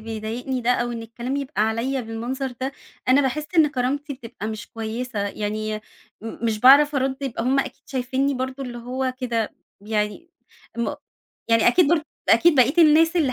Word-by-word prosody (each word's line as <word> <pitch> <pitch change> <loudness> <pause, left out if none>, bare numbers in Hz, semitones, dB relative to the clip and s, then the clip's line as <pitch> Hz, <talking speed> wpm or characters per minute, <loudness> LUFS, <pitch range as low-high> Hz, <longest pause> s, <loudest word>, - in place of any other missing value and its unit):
بيضايقني 225 +4 -4
ده، 240 +1 +1
أو 240 -1 +1
إن 230 -1 -5
الكلام 240 +4 -4
يبقى 280 -5 -1
عليّا 230 +5 0
بالمنظر 245 +3 -4
ده، 265 +1 -2 0.4
أنا 265 +3 +6
باحس 285 +3 -1
إن 315 -2 +7
كرامتي 280 +2 -2
بتبقى 230 -4 -8
مش 215 0 -6
كويسة، 225 +1 -4
يعني 215 +1 -3 0.4
م 225 +1 -7
مش 215 -1 -1
باعرف 285 +3 +7
أرُد، 265 0 0
يبقى 240 -4 -3
هُم 265 +3 +2
أكيد 275 0 -3
شايفينّي 265 +1 -1
برضو 260 +1 -4
اللي 240 -2 -6
هو 255 +2 -3
كده 230 -4 -2 0.3
يعني 210 - -3 0.5
م 235 - -1 0.5
يعني 230 +1 +5
أكيد 330 +4 +4
برض 320 -1 +3 0.3
أكيد 335 -2 +6
بقية 260 +3 +4
الناس 325 +2 +6
اللي 280 -6 +2
255 Hz, 170 wpm, -23 LUFS, 225-275 Hz, 0.5 s, إن